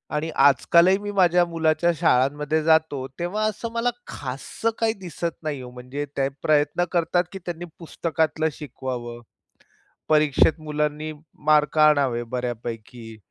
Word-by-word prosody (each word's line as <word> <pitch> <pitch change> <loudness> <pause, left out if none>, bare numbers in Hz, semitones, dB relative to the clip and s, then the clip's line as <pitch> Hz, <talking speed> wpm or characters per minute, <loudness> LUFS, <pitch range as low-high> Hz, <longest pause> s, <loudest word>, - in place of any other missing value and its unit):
आणि 160 +2 -1
आजकालही 170 +7 +5
मी 205 0 -5
माझ्या 180 -3 +4
मुलाच्या 165 0 +1
शाळांमध्ये 150 +1 +2
जातो, 160 -4 +2
तेव्हा 195 +5 -2
असं 215 +2 -3
मला 235 +1 +1 0.2
खाससं 135 - -4
काही 225 -1 +2
दिसत 170 -2 -5
नाही 145 -4 -3
हो. 125 - -9
म्हणजे 125 +4 -6
ते 135 0 +2 0.2
प्रयत्न 150 +2 +2
करतात 175 +1 +2
की 195 - -6
त्यांनी 175 0 -5
पुस्तकातलं 160 -1 -1
शिकवावं. 125 -4 -6 0.9
परीक्षेत 155 +1 +3
मुलांनी 150 0 -2 0.3
मार्क 150 0 +3
आणावे 140 -6 +4
बऱ्यापैकी. 115 -1 -5
155 Hz, 125 wpm, -24 LUFS, 135-170 Hz, 0.9 s, आजकालही